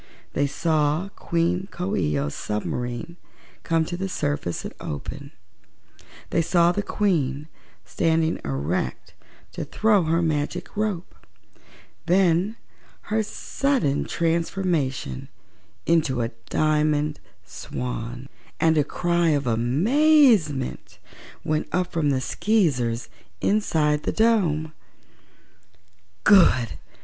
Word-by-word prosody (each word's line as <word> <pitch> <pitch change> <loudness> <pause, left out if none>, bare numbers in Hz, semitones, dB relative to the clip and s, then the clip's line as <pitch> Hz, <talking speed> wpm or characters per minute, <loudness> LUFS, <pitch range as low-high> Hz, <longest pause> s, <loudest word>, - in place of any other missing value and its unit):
They 145 +1 +1
saw 155 +4 0
Queen 175 0 -1
Coo 185 +3 -3
ee 75 -1 0
oh's 70 +1 -2
submarine 120 +8 -4 0.4
come 165 -1 +1
to 175 - -4
the 190 +2 -3
surface 145 - -2
and - - -6
open; 140 - -6 1.0
they - - +2
saw 170 +1 +3
the 205 - -1
Queen 150 -9 0 0.4
standing 165 0 +1
erect 70 +6 -3 0.4
to - - -5
throw 210 -5 +2
her 165 +2 +1
magic 160 +4 -2
rope; 205 -4 -2 0.9
they 180 -1 +4
saw 190 +6 -1 0.6
her 220 +1 +3
sudden 230 - -1
transformation 165 - -1 0.6
into 150 -7 +2
a 115 - -1 0.2
Diamond 150 -1 +1 0.3
Swan, 125 +1 -6 0.3
and 160 -1 +3
a - - +4
cry 170 +3 0
of 145 -3 +1
amazement 165 - +3 0.5
went 155 0 -1
up 180 0 0
from 155 -3 +1
the 130 -2 +1
Skeezers 130 - 0 0.3
inside 155 -8 +1
the - - -2
dome. 175 -9 +2 1.5
"Good!" 170 - +5
160 Hz, 105 wpm, -24 LUFS, 135-180 Hz, 1.5 s, Good